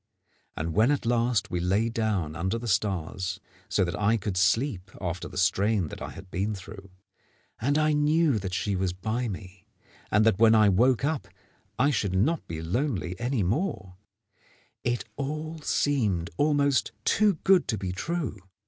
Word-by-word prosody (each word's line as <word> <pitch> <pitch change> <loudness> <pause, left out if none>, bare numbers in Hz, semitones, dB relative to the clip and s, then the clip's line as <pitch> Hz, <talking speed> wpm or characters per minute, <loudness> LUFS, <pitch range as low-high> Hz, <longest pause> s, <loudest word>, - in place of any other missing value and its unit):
And 80 +1 -2
when 110 - +4
at 145 -4 0
last 115 -2 +1
we 90 - -1
lay 95 +6 +1
down 105 -9 -1
under 95 +6 -1
the 120 +1 -6
stars, 95 -2 -1 0.3
so 100 - +2
that 85 - -2
I 105 +3 +2
could 100 -2 -3
sleep 95 +2 +1
after 90 -1 -4
the - - -9
strain 95 0 +2
that - - -9
I - - -4
had 95 - -11
been 100 +3 -1
through, 95 +1 -10 0.7
and 140 +6 +1
I 155 0 +3
knew 150 -3 +3
that 95 -1 -4
she 100 0 -1
was 95 -1 -1
by 110 +6 -2
me, 95 -1 -8 0.4
and 105 +2 +3
that 110 -3 +3
when 115 0 +6
I 105 -2 +6
woke 125 +7 +3
up 155 -2 -1 0.5
I 140 +5 +3
should 100 -8 -1
not 145 - +1
be 80 -1 -5
lonely 95 - -1
any 120 -2 0
more, 100 - -2 0.9
it 120 -1 -1
all 155 +3 -4
seemed 110 - 0
almost 145 -2 +2
too 210 -2 +3
good 190 -1 +4
to 110 - 0
be 95 -2 -3
true. 140 - -3
110 Hz, 170 wpm, -27 LUFS, 95-135 Hz, 0.9 s, when